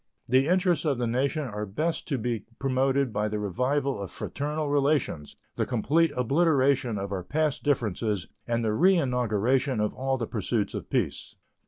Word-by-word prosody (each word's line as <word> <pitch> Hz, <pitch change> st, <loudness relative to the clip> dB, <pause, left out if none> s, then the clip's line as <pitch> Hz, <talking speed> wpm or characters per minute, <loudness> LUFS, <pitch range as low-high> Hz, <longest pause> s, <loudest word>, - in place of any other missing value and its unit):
The 130 Hz, +3 st, +3 dB
interests 180 Hz, -1 st, +2 dB
of 145 Hz, -5 st, +1 dB
the 120 Hz, -, -1 dB
nation 135 Hz, +6 st, 0 dB
are 105 Hz, -5 st, -4 dB
best 155 Hz, +12 st, -2 dB
to 140 Hz, -, 0 dB
be 115 Hz, -3 st, -2 dB
promoted 135 Hz, -1 st, +1 dB
by 105 Hz, +1 st, 0 dB
the 105 Hz, 0 st, -2 dB
revival 125 Hz, +5 st, -1 dB
of 100 Hz, -, -5 dB
fraternal 150 Hz, +1 st, -3 dB
relations, 140 Hz, -, 0 dB, 0.2 s
the -, -, +1 dB
complete 145 Hz, +7 st, +2 dB
obliteration 135 Hz, -3 st, +2 dB
of 100 Hz, 0 st, -4 dB
our 95 Hz, -2 st, -2 dB
past 150 Hz, -, 0 dB
differences, 110 Hz, -, 0 dB, 0.2 s
and 115 Hz, -1 st, 0 dB
the -, -, +2 dB
reinauguration 125 Hz, -, +2 dB
of 105 Hz, 0 st, 0 dB
all 135 Hz, 0 st, -1 dB
the 115 Hz, -, -2 dB
pursuits 110 Hz, -1 st, -2 dB
of -, -, -6 dB
peace. -, -, -2 dB
130 Hz, 165 wpm, -27 LUFS, 110-145 Hz, 0.2 s, The